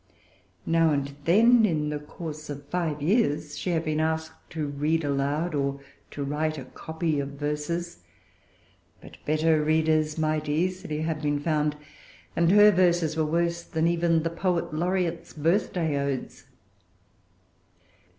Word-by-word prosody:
Now 165 Hz, 0 st, +3 dB
and 140 Hz, -1 st, -1 dB
then, 230 Hz, +7 st, +6 dB
in 155 Hz, -7 st, +1 dB
the 150 Hz, 0 st, -3 dB
course 155 Hz, 0 st, -8 dB
of 140 Hz, -1 st, -7 dB
five 160 Hz, -4 st, -2 dB
years, 155 Hz, -6 st, +1 dB
she 185 Hz, -, -4 dB
had 165 Hz, -1 st, 0 dB
been 155 Hz, 0 st, 0 dB
asked 160 Hz, 0 st, -3 dB
to 160 Hz, -3 st, -3 dB
read 150 Hz, +3 st, 0 dB
aloud 145 Hz, +4 st, -1 dB
or 140 Hz, -1 st, -1 dB, 0.3 s
to 145 Hz, -, -5 dB
write 155 Hz, +2 st, -1 dB
a 135 Hz, -, -7 dB
copy 160 Hz, +2 st, -3 dB
of 140 Hz, 0 st, -4 dB
verses. 150 Hz, +4 st, -3 dB, 1.0 s
But -, -, -14 dB
better 155 Hz, 0 st, +2 dB
readers 155 Hz, 0 st, +2 dB
might 155 Hz, -1 st, 0 dB
easily 175 Hz, 0 st, -1 dB
have 160 Hz, -1 st, -2 dB
been 145 Hz, -1 st, 0 dB
found; 150 Hz, -1 st, 0 dB, 0.6 s
and 170 Hz, 0 st, +3 dB
her 210 Hz, +1 st, +8 dB
verses 175 Hz, -4 st, +2 dB
were 160 Hz, -1 st, +1 dB
worse 170 Hz, +1 st, 0 dB
than 160 Hz, -1 st, -2 dB
even 170 Hz, -1 st, +2 dB
the 165 Hz, -, -1 dB
Poet 170 Hz, -1 st, -1 dB
Laureate's 175 Hz, +1 st, -1 dB
Birthday 165 Hz, -1 st, 0 dB
Odes. 140 Hz, -2 st, -4 dB
160 Hz, 140 wpm, -26 LUFS, 150-170 Hz, 1.0 s, her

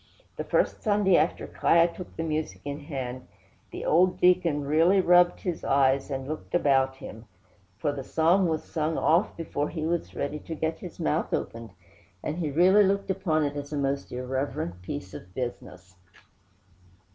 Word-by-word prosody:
The -, -, -4 dB
first -, -, 0 dB
Sunday 205 Hz, -4 st, +3 dB
after 160 Hz, +2 st, +1 dB
'Kiah 170 Hz, 0 st, +3 dB
took 180 Hz, -, -10 dB
the 165 Hz, -, -3 dB
music 155 Hz, -1 st, -3 dB
in 145 Hz, 0 st, -4 dB
hand, 130 Hz, -4 st, -6 dB, 0.4 s
the -, -, -7 dB
old 180 Hz, +3 st, +3 dB
deacon 175 Hz, -5 st, +3 dB
really 165 Hz, +7 st, +4 dB
rubbed 175 Hz, -1 st, +4 dB
his 175 Hz, -4 st, -3 dB
eyes 135 Hz, 0 st, +2 dB
and 135 Hz, -1 st, -4 dB
looked 155 Hz, +3 st, -5 dB
about 135 Hz, -5 st, +3 dB
him, 115 Hz, -3 st, -10 dB, 0.5 s
for 145 Hz, +8 st, -1 dB
the 140 Hz, -2 st, -6 dB
psalm 170 Hz, +6 st, +3 dB
was 160 Hz, -1 st, -1 dB
sung 160 Hz, 0 st, -2 dB
off 170 Hz, +6 st, +2 dB
before 150 Hz, -3 st, -3 dB
he 155 Hz, -2 st, -4 dB
was 170 Hz, 0 st, -2 dB
ready 145 Hz, +2 st, -3 dB
to 165 Hz, -, -7 dB
get 160 Hz, +1 st, -2 dB
his 180 Hz, -, -10 dB
mouth 75 Hz, -, 0 dB
opened, 115 Hz, 0 st, -5 dB, 0.5 s
and 155 Hz, -, -3 dB
he 160 Hz, -4 st, -1 dB
really 180 Hz, +8 st, +5 dB
looked 200 Hz, 0 st, +1 dB
upon 175 Hz, -5 st, 0 dB
it 145 Hz, 0 st, -3 dB
as 145 Hz, 0 st, -6 dB
a 150 Hz, -, -2 dB
most 140 Hz, 0 st, -2 dB
irreverent 125 Hz, -8 st, -3 dB
piece 95 Hz, +1 st, -6 dB
of 90 Hz, +1 st, -11 dB
business. 95 Hz, -7 st, -6 dB
155 Hz, 170 wpm, -27 LUFS, 135-175 Hz, 0.5 s, really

